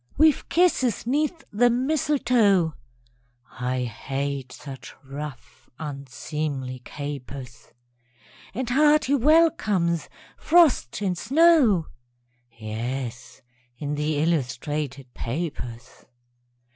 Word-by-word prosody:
_) - - -45
We've 310 -1 +4
kisses 325 -11 +2
'neath 305 +6 0
the 240 +4 +4
mistletoe 245 - +2 0.9
(I 125 0 -1
hate 135 +3 -4
such 135 -2 -10
rough, 140 -1 -9
unseemly 140 -2 -5
capers!) 140 -4 -7 0.9
And 255 +1 -2
hearty 300 +1 +4
welcomes, 240 - +3 0.3
frost 305 - +3
and 185 -2 0
snow; 265 - +4 0.7
(_Yes, 120 +3 -5 0.4
in 145 +1 -3
the 150 +1 -1
illustrated 140 -3 -2
papers. 125 -4 -6
155 Hz, 80 wpm, -25 LUFS, -, 0.9 s, We've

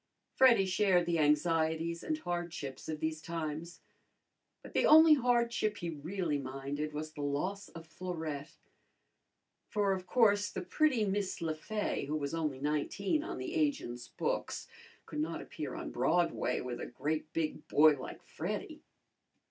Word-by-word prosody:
Freddy 240 -7 +6
shared 185 -2 +3
the 170 -1 +1
anxieties 160 +2 +2
and 310 - -1
hardships 175 - -4
of 155 -1 -3
these 155 0 -2
times. 165 +1 -5 0.8
But - - -11
the - - +3
only 315 0 +9
hardship 235 -5 +2
he 170 -1 -3
really 160 0 -2
minded 140 +3 -4
was 155 +1 -5
the 150 - -7
loss 180 +8 -2
of 165 0 -10
Florette, 160 -4 -5 1.1
for 205 -2 +1
of 185 -1 -5
course 205 -2 +4
the - - -5
pretty 275 -8 +2
Miss 195 -1 -1
Le 165 -2 -1
Fay, 210 +7 -2
who 150 - -2
was 140 -1 -2
only 155 -5 -1
nineteen 155 - 0
on - - -5
the - - -4
agents' 280 - -1
books, - - -3 0.4
could - - -5
not 160 +2 -2
appear 145 -4 -6
on - - -5
Broadway 170 +7 +1
with 125 -1 -5
a - - -4
great 155 +5 -3
big 155 -1 -2
boy 155 +1 +7
like - - -8
Freddy. - - -5
165 Hz, 150 wpm, -33 LUFS, 150-200 Hz, 1.1 s, only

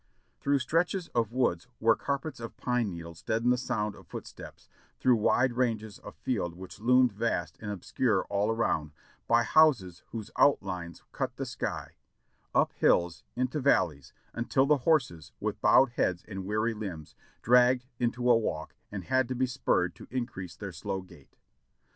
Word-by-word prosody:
Through 140 0 +2
stretches 165 +7 0
of 115 -2 0
woods 120 -7 0
where 115 0 +4
carpets 140 +4 -3
of 115 -1 -8
pine 125 -3 0
needles 85 -2 -8
deadened 115 +3 +1
the - - 0
sound 105 -5 -2
of - - -16
footsteps, - - -10 0.3
through 125 -2 +4
wide 120 +4 +2
ranges 110 -4 -1
of - - -11
field 90 -9 -2
which 95 +1 -10
loomed 125 +2 +4
vast 115 +3 -1
and 105 - -5
obscure 105 +1 0
all 100 +2 0
around, 80 -9 0 0.3
by 115 0 +4
houses 115 - +3
whose 110 -2 -7
out 140 - +5
lines 90 -3 -6
cut - - -3
the - - -4
sky, - - -5 0.6
up - - +3
hills, 85 -1 +2
into 130 +4 -1
valleys, 80 - +1 0.2
until 120 +3 +1
the 150 +1 +4
horses, 120 - +1
with - - -3
bowed 135 - +6
heads 90 -6 0
and 95 -3 -6
weary 110 +3 0
limbs, 95 -8 -7 0.3
dragged 125 +1 +5
into 120 +1 0
a 120 - +7
walk 80 -9 -2 0.2
and 100 -3 -5
had 130 +6 +1
to 130 - -3
be 130 +1 +2
spurred 120 -8 0
to - - -13
increase 120 -9 -4
their 100 -2 -6
slow 95 +1 -4
gait. 85 -7 -18
115 Hz, 165 wpm, -29 LUFS, 95-125 Hz, 0.6 s, a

